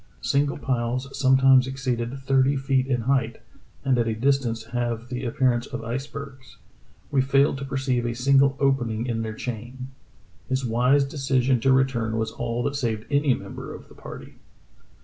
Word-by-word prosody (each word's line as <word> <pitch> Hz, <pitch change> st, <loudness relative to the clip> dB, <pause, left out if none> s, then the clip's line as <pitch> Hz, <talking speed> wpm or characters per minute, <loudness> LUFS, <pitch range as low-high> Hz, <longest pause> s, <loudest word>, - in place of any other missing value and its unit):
Single 140 Hz, 0 st, +1 dB
piles 130 Hz, 0 st, -2 dB
sometimes 130 Hz, -1 st, +5 dB
exceeded 125 Hz, -1 st, -3 dB
thirty 135 Hz, +1 st, +2 dB
feet 135 Hz, -1 st, +1 dB
in 125 Hz, -3 st, 0 dB
height, 120 Hz, -2 st, 0 dB, 0.5 s
and 130 Hz, -2 st, +3 dB
at 115 Hz, -, +1 dB
a 110 Hz, -, -1 dB
distance 120 Hz, -2 st, 0 dB
have 120 Hz, -1 st, -2 dB
the 125 Hz, 0 st, -4 dB
appearance 120 Hz, -1 st, +1 dB
of 115 Hz, -, -6 dB
icebergs. 130 Hz, +2 st, -7 dB, 0.5 s
We 135 Hz, -, +3 dB
failed 135 Hz, +1 st, +2 dB
to 140 Hz, -, -5 dB
perceive 130 Hz, -3 st, -1 dB
a 120 Hz, -, -3 dB
single 135 Hz, +2 st, +3 dB
opening 120 Hz, -5 st, +1 dB
in 115 Hz, -2 st, -2 dB
their 110 Hz, -1 st, -4 dB
chain. 125 Hz, +3 st, -6 dB, 0.3 s
" -, -, -31 dB
His 130 Hz, 0 st, 0 dB
wise 125 Hz, +5 st, +3 dB
decision 135 Hz, -2 st, +1 dB
to 135 Hz, +4 st, +3 dB
return 125 Hz, -4 st, +1 dB
was 110 Hz, 0 st, -1 dB
all 120 Hz, 0 st, -3 dB
that 140 Hz, -, -1 dB
saved 115 Hz, -6 st, -2 dB
any 140 Hz, -2 st, +3 dB
member -, -, -8 dB
of -, -, -13 dB
the -, -, -15 dB
party. -, -, -11 dB
130 Hz, 170 wpm, -24 LUFS, 120-135 Hz, 0.5 s, sometimes